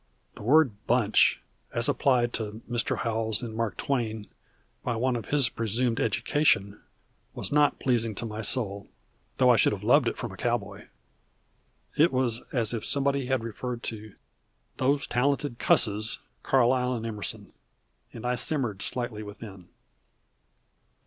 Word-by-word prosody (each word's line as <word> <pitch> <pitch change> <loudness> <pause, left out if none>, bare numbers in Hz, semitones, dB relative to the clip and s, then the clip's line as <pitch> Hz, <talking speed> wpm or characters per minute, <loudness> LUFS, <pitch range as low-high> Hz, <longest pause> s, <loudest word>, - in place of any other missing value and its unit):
The - - -12
word 120 -3 +3
bunch, 115 -3 +3 0.3
as 120 0 +1
applied 120 -3 +2
to 110 0 -5
Mr. 120 -1 0
Howells 110 -1 -1
and 110 -2 -5
Mark 115 -2 -2
Twain 110 -6 -2 0.6
by 120 - -1
one 125 +2 0
of 115 - -5
his 145 -4 +3
presumed 115 +1 -1
education 105 -2 +1 0.5
was - - -4
not 145 0 +3
pleasing 115 -4 0
to 115 - -4
my 110 0 -5
soul, 100 -3 -1 0.5
though - - +5
I - - +5
should - - +4
have - - -6
loved - - +4
it - - -2
from - - -5
a - - -10
cowboy. - - -2 1.1
It 160 +3 +4
was 125 -3 +1
as 120 -4 0
if 115 - -3
somebody 140 -2 +1
had 130 -3 0
referred 120 +2 -5
to 110 -2 -7 0.6
"those 140 +2 +1
talented 140 0 0
cusses, 110 0 +2 0.2
Carlyle 125 -1 +2
and 115 -1 -5
Emerson," 105 -2 -5 0.6
and 115 - -9
I 125 - +1
simmered 120 -5 -2
slightly 120 -4 -3
within. 100 -3 -10
115 Hz, 145 wpm, -27 LUFS, 110-130 Hz, 1.1 s, though